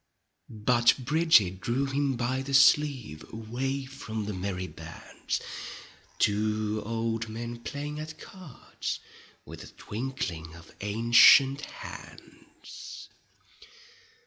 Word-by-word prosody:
But 120 +2 +3
Bridget 130 - +3
drew 120 +6 0
him 135 0 0
by 125 +2 -1
the 135 0 -1
sleeve. 135 - +4
Away 130 +5 -3
from 115 -5 -6
the 105 - -4
merry 95 0 -3
bands. 80 -3 -6 0.8
To 105 +1 +1
old 115 0 -2
men 120 +2 -6
playing 145 +4 -5
at 155 +1 -7
cards 180 - -7 0.5
With - - -10
a - - -11
twinkling 100 -9 -5
of 85 0 -15
ancient 120 +6 +6
hands. - - -11
120 Hz, 100 wpm, -28 LUFS, 105-135 Hz, 0.8 s, ancient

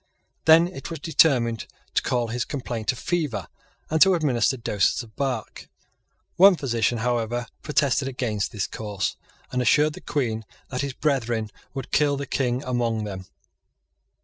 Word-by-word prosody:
Then 160 +2 +7
it 140 -7 -8
was 165 - -4
determined 130 - +2 0.3
to - - +3
call 120 -2 0
his 120 +1 -1
complaint 125 -5 -2
a - - -8
fever, 145 - -2 0.4
and 160 0 0
to 190 -1 +7
administer 130 -5 +1
doses 105 0 +1
of 110 -2 -16
bark. 135 -2 -3 0.7
One 195 +1 +8
physician, 120 -5 0
however, 120 0 0 0.2
protested 140 -3 +1
against 120 -6 -2
this 105 -3 -2
course, 105 -3 -3 0.4
and 125 - 0
assured 150 +4 +4
the - - -10
Queen 115 -6 -2 0.3
that 125 -1 -2
his 140 -2 -3
brethren 120 -7 -1 0.2
would 135 -2 -5
kill 145 -1 +3
the 140 - -4
King 125 -1 -1
among 120 -4 -1
them. 95 -3 -6
125 Hz, 150 wpm, -25 LUFS, 115-145 Hz, 0.7 s, One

